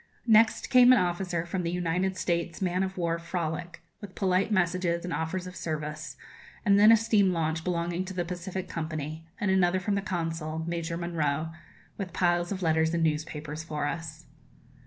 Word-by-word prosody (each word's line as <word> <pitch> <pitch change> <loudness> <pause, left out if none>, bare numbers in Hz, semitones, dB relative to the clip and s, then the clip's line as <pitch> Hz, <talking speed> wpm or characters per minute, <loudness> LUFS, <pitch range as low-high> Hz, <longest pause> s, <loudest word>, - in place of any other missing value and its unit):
Next 225 0 +4
came 250 -1 +8
an 255 - +7
officer 175 -2 -1
from 180 +2 -2
the 170 - -2
United 180 +2 -1
States' 170 -2 -1
man 185 -1 0
of 190 0 -2
war 170 -1 0
'Frolic,' 170 0 -4 0.2
with 200 -3 -9
polite 190 +2 +1
messages 175 -2 +1
and 180 - -3
offers 180 +3 -2
of 180 0 -8
service; 155 -1 -5 0.5
and 200 0 +5
then 210 +2 +8
a 225 - +8
steam 210 -4 +3
launch 160 -1 -1
belonging 175 0 -1
to 190 - -6
the 175 -1 -1
Pacific 180 +1 -5
Company, 155 -1 -5
and 205 -2 +1
another 185 -1 +3
from 200 +2 -1
the 200 - +1
Consul, 165 -4 -3
Major 170 0 -3
Monro, 160 -3 -1 0.5
with 185 -4 -4
piles 175 0 +1
of 190 -2 -3
letters 160 0 +2
and 165 - +1
newspapers 155 0 -2
for 150 -3 -3
us. 160 +1 -5
175 Hz, 180 wpm, -28 LUFS, 160-185 Hz, 0.5 s, came